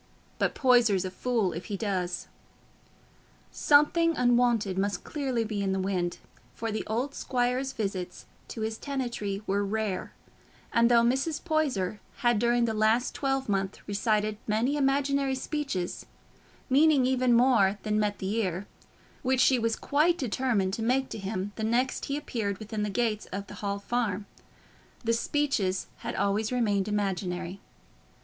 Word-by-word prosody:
But - - +1
Poyser's 235 -8 +4
a 185 - -4
fool 220 -2 0
if 170 - -6
he 205 - -4
does." 185 -4 -2 1.3
Something 330 +3 +4
unwonted 240 -5 +3
must 200 -2 -1
clearly 265 -6 -1
be 215 -2 -3
in 195 -1 0
the 190 - -1
wind, 185 -2 -1 0.4
for 225 0 -3
the 215 - -2
old 245 +6 -1
squire's 255 +1 -1
visits 195 -6 -4 0.2
to 225 - -7
his 220 0 -3
tenantry 235 -8 -3
were 200 0 +1
rare; 205 -2 -2 0.6
and 235 0 +4
though 235 -1 +5
Mrs. 265 +6 0
Poyser 265 - 0 0.3
had 240 -3 +4
during 240 +1 +3
the 225 - -1
last 220 +3 +2
twelvemonth 240 -9 -1
recited 210 0 0
many 225 +6 +1
imaginary 275 -1 +1
speeches, 265 - -3 0.6
meaning 285 0 +5
even 255 -1 +2
more 235 -5 +4
than 215 0 +1
met 210 -1 0
the 190 +2 -3
ear, 190 -3 -1 0.6
which 260 -1 +1
she 260 -1 +5
was 230 0 +1
quite 310 +4 +2
determined 230 - 0
to 225 - -3
make 260 +4 +1
to - - -6
him 195 0 -3
the 220 - -3
next 240 +4 +1
time - - -10
he 280 - -1
appeared 215 -9 -3
within 215 +1 -5
the 210 - -1
gates 215 0 -1
of 195 +1 -5
the - - -11
Hall 200 -1 -1
Farm, 210 -2 -2 0.8
the 230 0 +2
speeches 230 -7 0
had - - -5
always 210 +3 0
remained 210 -5 +1
imaginary. 190 -3 -2
225 Hz, 155 wpm, -28 LUFS, 200-255 Hz, 1.3 s, though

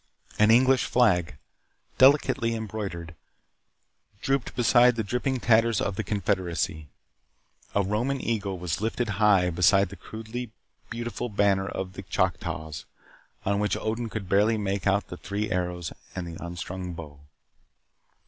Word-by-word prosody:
An 105 +1 +5
English 130 +3 +5
flag, 100 -9 +2 0.6
delicately 130 -3 +4
embroidered, 100 -7 -5 1.1
drooped 135 +1 -1
beside 120 0 +5
the 115 - -1
dripping 125 +5 -1
tatters 115 -2 +3
of 100 - -1
the 110 - -2
Confederacy. 90 -6 -1 0.9
A 100 - +3
Roman 120 +8 -1
eagle 100 -6 -2
was 85 +1 -3
lifted 115 +1 -1
high 95 -4 +4
beside 90 +3 +4
the 100 - -9
crudely 110 +5 -7 0.4
beautiful 120 +1 -4
banner 100 -2 +2
of 95 -1 -5
the 95 - -7
Choctaws 80 -4 -2 0.6
on 100 +1 +1
which 105 0 0
Odin 115 +1 -3
could 105 -3 -5
barely 105 +4 +3
make 100 -1 -2
out 100 +1 +1
the 90 - -7
three 100 +3 -3
arrows 90 -2 -2 0.2
and 90 -2 -4
the 85 -1 -8
unstrung 90 +1 -5
bow. 75 -4 -9
100 Hz, 135 wpm, -26 LUFS, 90-115 Hz, 1.1 s, An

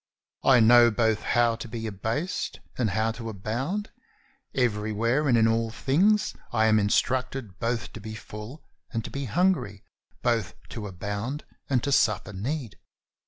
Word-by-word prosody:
I 130 -3 +6
know 120 +1 +7
both 110 -1 +1
how 120 -1 +2
to 115 - -7
be 115 0 -5
abased 115 - -3 0.2
and 120 -4 0
how 110 +4 +1
to 115 0 -6
abound; 130 - -3 0.6
everywhere 115 +3 +1
and 120 -3 +4
in 115 0 +5
all 115 0 +1
things 190 - +2 0.2
I 110 -2 +3
am 110 -1 +5
instructed 125 0 0
both 115 -1 -2
to - - -7
be 110 +1 -7
full 105 +7 -9 0.3
and 115 -3 -2
to - - -7
be 140 0 -3
hungry, 165 - +1 0.4
both 115 -5 0
to 110 -3 -5
abound 100 - -4 0.2
and 130 -4 +2
to 140 - -1
suffer 105 -5 +2
need. 120 +4 -4
115 Hz, 155 wpm, -27 LUFS, 110-130 Hz, 0.6 s, know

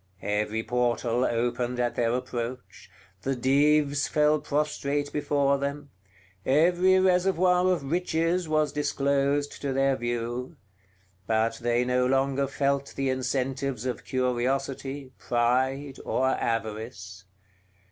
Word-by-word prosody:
Every 105 +2 -1
portal 120 +1 0
opened 120 +1 -1
at 120 -1 0
their 115 -1 +1
approach; 125 0 -5 0.3
the 135 +5 -1
Dives 145 +3 +2
fell 150 0 +3
prostrate 145 -1 -1
before 140 -1 +1
them; 140 0 -4 0.5
every 175 +6 +4
reservoir 185 0 +3
of 145 -6 -2
riches 170 0 0
was 155 -2 +2
disclosed 140 0 0
to 140 -2 -2
their 135 0 +2
view: 120 +4 -4 0.7
but 115 +1 +1
they 120 +1 +1
no 125 0 +2
longer 135 +1 +1
felt 140 0 -1
the 135 -1 0
incentives 130 -1 -2
of 125 - -3
curiosity, 130 +2 -2
pride, 130 +3 0
or 130 0 +1
avarice. 110 -5 -3
135 Hz, 110 wpm, -27 LUFS, 120-145 Hz, 0.7 s, every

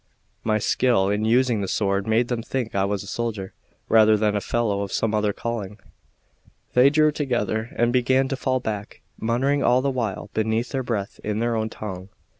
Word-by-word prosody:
My 110 -1 +2
skill 110 -2 +2
in 105 +1 0
using 120 -1 +2
the 95 - -2
sword 100 0 0
made 115 +2 +2
them 120 -2 -2
think 120 -1 -3
I 95 0 +1
was 100 0 -2
a - - -11
soldier 105 -3 -4 0.3
rather 110 -1 +5
than 105 0 +1
a 105 - 0
fellow 105 -4 0
of 100 -1 -4
some 110 -1 0
other 105 -1 +1
calling. 105 -2 -5 1.0
They 125 +2 +6
drew 155 +1 +3
together 120 -6 -2
and 120 0 +2
began 130 +1 +3
to 135 - -1
fall 130 -1 0
back, 105 -3 -5 0.2
muttering 130 +5 +1
all 125 0 +3
the 140 - +1
while 110 -5 -3
beneath 110 +2 0
their 135 - -2
breath 110 -5 -3
in 105 0 -2
their 115 +1 0
own 110 0 -1
tongue. 95 -4 -7
110 Hz, 195 wpm, -23 LUFS, 105-125 Hz, 1.0 s, They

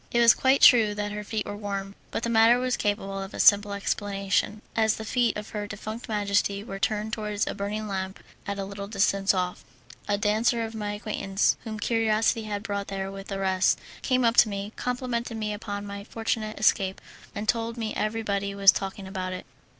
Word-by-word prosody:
It 240 - +1
was 235 -1 +8
quite 265 +1 +3
true 220 -4 +7
that 205 0 -3
her 210 0 -5
feet 215 0 -3
were 205 - -5
warm, 200 -1 -4 0.2
but - - -3
the 235 - 0
matter 225 +1 +6
was 255 0 0
capable 195 -1 -2
of 195 +1 -7
a - - -7
simple 205 0 +5
explanation, 200 +1 -1
as 220 -1 +3
the 220 - -7
feet 240 0 +1
of 210 0 -7
her 210 -2 -4
defunct 215 +3 -7
majesty 200 -1 0
were 195 -3 -7
turned 215 +2 -1
towards 210 -1 -1
a - - -3
burning 210 +1 -3
lamp 190 -1 -4 0.3
at 200 0 -2
a 195 - -3
little 200 0 -7
distance 195 -1 +2
off. 180 -2 -2 0.4
A 205 - +1
dancer 225 +3 +1
of 225 - -7
my 210 -2 -3
acquaintance, 205 -2 0
whom 215 -1 -5
curiosity 225 0 +1
had 205 -1 -4
brought 200 -2 -3
there 195 0 -4
with 195 0 -8
the 195 - -4
rest, 190 -1 +2 0.2
came 255 -1 +2
up 230 +1 +2
to 220 - +7
me, 200 +1 -5
complimented 245 -2 -3
me 215 -1 -2
upon 205 -1 -5
my 200 0 -6
fortunate 220 0 -3
escape, 195 -3 +2 0.4
and 205 +1 -4
told 230 +1 0
me 220 -2 -3
everybody 200 -2 -2
was 195 -1 +7
talking 195 0 -5
about 185 -1 -4
it. 185 - -7
210 Hz, 205 wpm, -26 LUFS, 200-225 Hz, 0.4 s, was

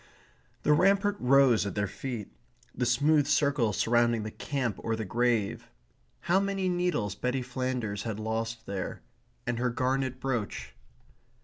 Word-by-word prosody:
The 150 - +4
rampart 195 +5 +3
rose 130 -3 +5
at - - -5
their 105 0 +1
feet 115 +1 -6 0.4
the 125 - -1
smooth 145 +4 +3
circle 140 -6 +2
surrounding 120 +1 +2
the 110 - -5
camp 125 -7 -2
or 115 - -1
the 110 -1 -4
grave. 115 0 0 0.5
How 175 +3 +3
many 195 -1 -1
needles 175 - 0
Betty 125 +4 -2
Flanders 125 -5 -3
had 110 -2 -4
lost 115 +1 -3
there; 100 -1 -5 0.4
and 120 -1 -1
her 125 0 +1
garnet 130 +1 -1
brooch. 125 -6 -3
125 Hz, 140 wpm, -29 LUFS, 110-140 Hz, 0.5 s, rose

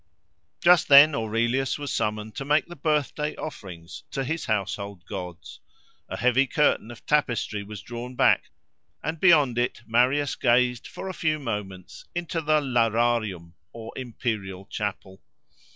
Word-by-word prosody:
Just 175 -2 +5
then 145 +2 +9
Aurelius 120 +3 0
was 145 -1 -4
summoned 105 0 -2
to - - -5
make 150 +2 +2
the 175 - -11
birthday 150 0 -1
offerings 90 - -8
to 135 - -3
his 160 +5 -3
household 100 -3 -3
gods. 90 -3 -8 0.5
A - - -4
heavy 125 +3 +3
curtain 145 -6 +1
of 120 - -12
tapestry 120 -8 0
was 100 -1 -9
drawn 120 +1 -7
back; - - +3 0.5
and 160 0 -3
beyond 150 -9 +5
it 120 - -2
Marius 130 +5 +2
gazed 125 -1 +2
for 190 - -8
a 190 - -4
few 155 -3 0
moments 105 -8 -6
into 170 -1 -2
the 155 0 +2
Lararium, 115 - 0 0.2
or 115 -1 -9
imperial 110 -6 -4
chapel. 95 -2 -5
120 Hz, 140 wpm, -25 LUFS, 105-145 Hz, 0.5 s, then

